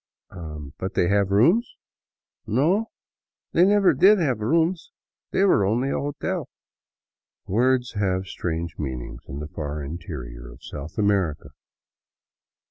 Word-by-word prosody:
" 75 -3 -9
But 95 +2 -4
they 85 - +2
have 100 -1 +2
rooms? 165 - +3 0.2
" - - -70
" - - -50
No, 170 - +2 0.6
they 170 - +4
never 200 -1 +5
did 210 +3 +6
have 135 - 0
rooms. 165 - +1 0.4
They 195 - +1
were 185 - +4
only 120 +7 +1
a - - 0
hotel." 145 0 -3 1.0
Words 125 +4 +2
have 95 -3 0
strange 85 -2 -4
meanings 60 -4 -5
in 70 - -7
the 75 +1 -5
far 75 -1 -5
interior 70 -6 -7
of - - -16
South 75 +2 -8
America. 100 -7 +1
100 Hz, 135 wpm, -24 LUFS, -, 1.0 s, did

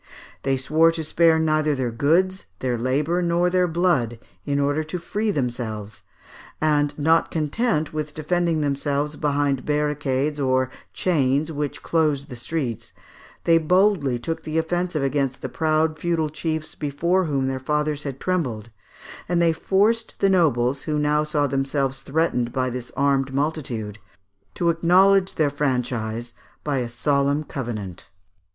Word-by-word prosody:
They 135 0 0
swore 155 +5 +3
to 160 - -3
spare 165 +1 +3
neither 155 -1 +2
their 130 -3 -2
goods, 170 +10 +1
their 125 +1 -1
labour, 145 +9 0
nor 175 +1 +1
their 180 0 +3
blood, 160 -9 +1 0.3
in 140 -1 0
order 145 +2 +1
to 155 +3 -4
free 210 +5 -2
themselves; 115 - -3 0.6
and 145 -2 +1
not 160 +2 +3
content 160 +2 -1
with 150 -1 -4
defending 165 +1 0
themselves 145 +1 -1
behind 145 -3 0
barricades 150 -1 0
or 130 -1 +1 0.2
chains 150 -3 +1
which 145 -2 -4
closed 150 -3 0
the 125 - -7
streets, 120 -3 -4 0.5
they 165 -1 +5
boldly 180 -5 +2
took 165 +7 -4
the 155 +1 -3
offensive 170 -1 -1
against 135 -1 -1
the - - -3
proud 155 0 +1
feudal 165 -2 0
chiefs 155 0 -3
before 170 +6 0
whom 140 -4 0
their 130 0 -2
fathers 150 +2 -1
had 135 -2 -6
trembled, 125 - -2 0.6
and 175 -1 +2
they 170 -1 +4
forced 210 +7 +1
the 195 - +3
nobles, 135 -7 +2
who 150 -1 -2
now 150 0 +2
saw 150 -1 0
themselves 135 -1 -1
threatened 135 -5 0
by 130 -1 -1
this 125 0 -6
armed 135 -1 +2
multitude, 130 -8 -2 0.6
to 170 -1 +2
acknowledge 185 +3 +4
their 150 -3 +2
franchise 120 -5 -2 0.3
by 145 -2 -1
a 120 -1 -3
solemn 140 +4 +1
covenant. 110 - -6
150 Hz, 145 wpm, -23 LUFS, 135-165 Hz, 0.6 s, they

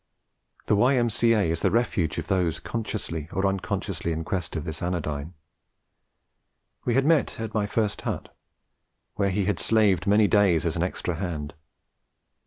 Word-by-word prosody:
The - - +3
Y.M.C.A. 115 -1 +3
is 85 - -1
the - - +2
refuge 100 -9 0
of - - -3
those 90 -4 0
consciously 95 -7 -4
or 95 - 0
unconsciously 95 -3 -2
in 80 0 -2
quest 85 -1 -3
of 80 -1 -3
this 80 -1 -5
anodyne. 80 -2 -3 1.5
We 120 - +1
had 135 +1 +3
met 155 -7 +2
at 110 -1 -4
my 105 -2 0
first 105 0 -1
hut, - - -5 0.8
where 100 -1 +1
he 95 +1 0
had 105 - 0
slaved 105 -5 +2
many 105 +1 +5
days 95 -6 +3
as 85 - 0
an 85 - -1
extra 90 -1 -2
hand. 80 -6 -4
95 Hz, 155 wpm, -26 LUFS, 85-110 Hz, 1.5 s, many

